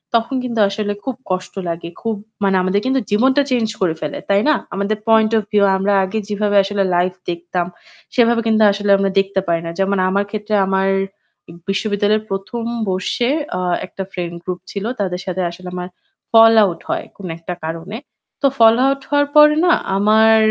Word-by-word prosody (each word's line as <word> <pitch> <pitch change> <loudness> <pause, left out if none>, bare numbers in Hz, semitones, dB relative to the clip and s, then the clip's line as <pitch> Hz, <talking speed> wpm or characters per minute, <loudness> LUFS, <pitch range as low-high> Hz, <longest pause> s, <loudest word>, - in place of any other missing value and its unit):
তখন 230 +3 0
কিন্তু 235 -3 -3
আসলে 205 0 -2
খুব 265 -2 -3 0.2
কষ্ট 185 0 -3 0.2
লাগে। 170 0 -5
খুব 225 -1 -2 0.3
মানে 195 -1 +2
আমাদের 185 +2 +1
কিন্তু 265 0 +1
জীবনটা 260 +7 +3
চেঞ্জ 230 -3 +1
করে 165 -4 +1
ফেলে। 150 - -4
তাই 200 +1 +3
না? 305 - +4 0.2
আমাদের 200 +2 -1
পয়েন্ট 220 0 +4
ওফ 215 - 0
ভিউ 205 -1 +3
আমরা 200 +2 +1
আগে 190 +4 -3
যেভাবে 205 0 0
আসলে 200 0 -1
লাইভ 180 +1 +1 0.2
দেখতাম। 175 +1 -3 0.5
সেভাবে 235 -1 +3
কিন্তু 220 -1 +3
আসলে 205 0 -3
আমরা 195 0 +1
দেখতে 195 0 0
পাই 170 -1 +1
না। 165 - -4
যেমন 195 +1 +1
আমার 200 +1 +1
ক্ষেত্রে 215 0 -4
আমার 190 0 +1 0.8
বিশ্ববিদ্যালয়ের 205 +1 0
১ম 195 +4 -4 0.3
বর্ষে 190 +6 -1 0.3
আ - - -2 0.3
একটা 195 - -7
ফ্রেন্ড 175 -2 -5
গ্রুপ 180 -1 -4
ছিল। 200 - -5 0.2
তাদের 180 -2 -2
সাথে 185 0 -3
আসলে 180 +1 -11
আমার 180 0 -5 0.5
ফল 225 0 +8
আউট 180 -4 -1
হয় - - -2
কোন 190 -2 -8
একটা 165 +2 -6
কারণে। 165 +6 -5 0.4
তো 275 - +4
ফল 225 0 +6
আউট 275 0 +1
হওয়ার 290 0 +2
পরে 300 0 +7
না 350 - +5 0.2
আমার 220 +2 +5
200 Hz, 180 wpm, -18 LUFS, 185-225 Hz, 0.8 s, ফল